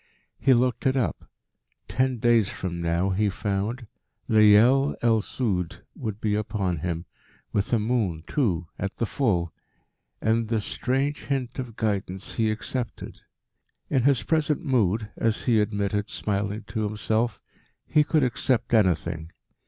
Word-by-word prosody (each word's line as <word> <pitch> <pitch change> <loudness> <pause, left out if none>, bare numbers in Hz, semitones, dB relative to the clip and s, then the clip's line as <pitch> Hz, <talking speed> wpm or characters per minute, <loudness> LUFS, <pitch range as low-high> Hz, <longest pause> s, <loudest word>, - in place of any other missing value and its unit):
He 135 -2 +5
looked 125 +3 +1
it 130 +1 +2
up. 125 - -2 0.6
Ten 130 -1 0
days 115 -3 +3
from 85 -2 -4
now, 85 +3 +1
he 105 +2 +1
found, 105 +5 -2 0.4
Leyel 110 +6 +5
el 115 -2 +4
Sud 95 -7 -2
would 110 -2 -5
be 105 -2 0
upon 100 -4 -1
him, 85 +2 -3 0.5
with 100 - 0
a 120 - +4
moon, 105 -8 0
too, 95 - 0
at 100 0 -3
the 115 - -1
full. 95 - 0 0.7
And 110 +1 +1
this 110 -2 -1
strange 135 +3 -1
hint 130 -3 -2
of 120 -4 -5
guidance 100 -4 -2
he 110 -1 +1
accepted. 115 +3 -4 0.7
In 135 - +3
his 140 +1 +3
present 155 +1 0
mood, 110 - +1
as 115 -1 0
he 115 -4 +3
admitted, 105 0 -1
smiling 105 +1 -2
to 110 - -2
himself, 110 +1 -1 0.5
he 150 - +4
could 150 0 +2
accept 125 -1 0
anything. 85 -6 +2
110 Hz, 140 wpm, -26 LUFS, 100-125 Hz, 0.7 s, He